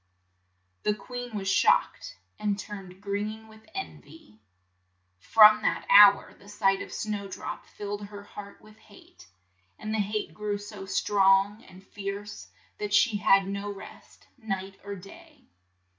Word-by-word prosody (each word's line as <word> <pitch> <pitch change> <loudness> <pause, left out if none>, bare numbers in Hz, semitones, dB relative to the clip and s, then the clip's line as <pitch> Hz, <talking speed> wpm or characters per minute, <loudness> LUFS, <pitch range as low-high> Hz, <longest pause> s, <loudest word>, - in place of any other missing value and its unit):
The 210 - 0
queen 245 +2 -7
was 195 -1 -4
shocked, - - +2 0.2
and 205 -1 -1
turned 195 -3 -9
green 210 +2 -4
with 220 +3 -18
en 390 - -6
vy. 145 -8 -18 0.8
From 215 - +7
that - - -1
hour 200 -1 +7
the 200 - -18
sight 195 -1 +1
of - - -8
Snow 210 -2 -4
drop 195 - -7
rilled 205 0 -5
her 205 0 -10
heart 200 0 -11
with 215 0 -17
hate; 200 - -18 0.5
and 215 - -5
the 220 - 0
hate 210 +1 -2
grew 210 -1 -3
so 205 -1 -9
strong 195 +2 +2
and 185 +1 -16
fierce 205 +1 -7 0.3
that 205 -1 -1
she 225 -3 +4
had 195 -1 +4
no 200 +1 -4
rest 195 - -13
night 195 -3 -5
or 200 0 -6
day. 285 - -15
205 Hz, 145 wpm, -27 LUFS, 195-215 Hz, 0.8 s, From